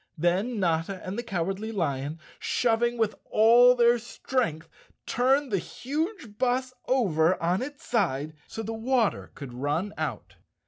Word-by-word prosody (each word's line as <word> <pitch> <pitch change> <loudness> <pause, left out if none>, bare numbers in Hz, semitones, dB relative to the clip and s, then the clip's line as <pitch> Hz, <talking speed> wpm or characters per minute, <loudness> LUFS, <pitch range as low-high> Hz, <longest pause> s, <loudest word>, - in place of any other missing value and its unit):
Then 190 +8 +1
Notta 170 +1 0
and 185 - -4
the 235 - -2
Cowardly 195 0 -3
Lion, 150 -5 -2 0.2
shoving 240 0 +1
with 220 -2 +1 0.2
all 240 +3 +6
their 240 0 +4
strength, 230 - -2 0.4
turned 265 +2 +2
the 195 - +2
huge 290 - -4
bus 255 0 +1
over 185 -9 +2
on 175 +3 +1
its 285 +2 -7
side 155 - 0
so 225 - -6
the 225 +1 -4
water 230 0 0
could 135 -4 -8
run 145 +10 -2
out. 145 -9 -4
215 Hz, 140 wpm, -27 LUFS, 165-245 Hz, 0.4 s, all